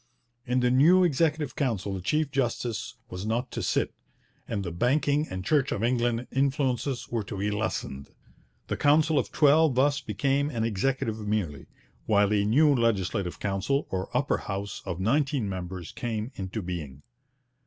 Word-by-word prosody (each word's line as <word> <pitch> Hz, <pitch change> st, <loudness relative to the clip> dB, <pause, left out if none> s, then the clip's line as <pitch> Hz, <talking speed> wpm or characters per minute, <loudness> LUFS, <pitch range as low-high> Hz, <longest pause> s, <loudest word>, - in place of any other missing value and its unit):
In 125 Hz, +1 st, +1 dB
the 125 Hz, 0 st, +3 dB
new 165 Hz, +9 st, +6 dB
Executive 155 Hz, -3 st, +1 dB
Council 105 Hz, -8 st, -1 dB
the 95 Hz, -, -4 dB
chief 150 Hz, -, 0 dB
justice 120 Hz, -5 st, -2 dB, 0.2 s
was 90 Hz, +1 st, -5 dB
not 120 Hz, +4 st, -1 dB
to -, -, -3 dB
sit, -, -, 0 dB, 0.5 s
and 100 Hz, -3 st, -2 dB
the 85 Hz, -, -4 dB
banking 140 Hz, -, +1 dB
and 95 Hz, 0 st, -5 dB
Church 145 Hz, -1 st, +2 dB
of 100 Hz, -, -2 dB
England 120 Hz, 0 st, +1 dB
influences 135 Hz, -2 st, 0 dB
were 115 Hz, -2 st, -1 dB
to 100 Hz, 0 st, -7 dB
be 105 Hz, +2 st, -1 dB
lessened. 105 Hz, -10 st, -3 dB, 0.6 s
The -, -, -3 dB
Council 150 Hz, +1 st, +4 dB
of 110 Hz, -6 st, -3 dB
Twelve 150 Hz, -1 st, +4 dB
thus 145 Hz, +2 st, +2 dB
became 135 Hz, +7 st, 0 dB
an 115 Hz, -6 st, -2 dB
Executive 115 Hz, +1 st, -1 dB
merely, 90 Hz, -10 st, -2 dB, 0.4 s
while 105 Hz, -1 st, +3 dB
a 100 Hz, -1 st, +3 dB
new 145 Hz, +8 st, +5 dB
Legislative 100 Hz, -7 st, 0 dB
Council, 105 Hz, +8 st, 0 dB
or 95 Hz, 0 st, -2 dB
Upper 140 Hz, +3 st, +1 dB
House, 100 Hz, 0 st, -5 dB
of 90 Hz, -2 st, -3 dB
nineteen 135 Hz, +3 st, +1 dB
members, 90 Hz, -2 st, -5 dB
came 115 Hz, 0 st, -4 dB
into 95 Hz, +2 st, -4 dB
being. 75 Hz, -6 st, -6 dB
115 Hz, 160 wpm, -27 LUFS, 100-140 Hz, 0.6 s, new